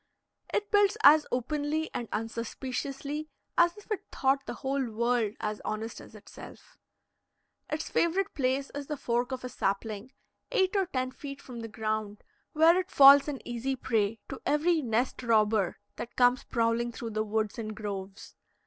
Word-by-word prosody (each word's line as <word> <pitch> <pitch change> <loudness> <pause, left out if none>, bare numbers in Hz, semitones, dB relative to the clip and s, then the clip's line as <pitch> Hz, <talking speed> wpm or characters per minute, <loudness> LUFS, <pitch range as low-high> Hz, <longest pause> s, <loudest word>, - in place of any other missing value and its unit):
It 415 0 -1
builds 410 0 +4
as 300 +1 +8
openly 295 +5 -1
and 235 - -4
unsuspiciously 265 +6 -4 0.3
as 345 +2 +4
if 415 +1 -15
it 425 - -1
thought 270 0 +1
the 240 - -4
whole 270 -1 -2
world 230 -1 0
as 210 0 -3
honest 220 +2 -4
as - - -14
itself. - - -13 0.9
Its 305 +1 -3
favorite 380 +4 +1
place 270 0 0
is 285 -1 -5
the 300 - -3
fork 245 -1 -1
of 255 -1 -4
a - - -3
sapling, 210 +3 -2 0.4
eight 380 -4 +2
or 390 -2 +2
ten 255 -5 -2
feet 275 +1 -8
from 245 -2 -9
the 225 - -5
ground, 215 -1 -3 0.3
where 325 +3 +6
it 370 +1 -4
falls 280 -1 +8
an 285 -3 -5
easy 240 +3 -2
prey 225 -4 0
to 270 - -7
every 315 +3 +2
nest 240 0 -1
robber 215 -5 +2 0.2
that 240 - -7
comes 245 0 +3
prowling 235 0 0
through 230 0 -6
the 215 0 0
woods 215 0 -2
and 215 -1 -5
groves. 200 -2 -6
255 Hz, 165 wpm, -29 LUFS, 225-295 Hz, 0.9 s, as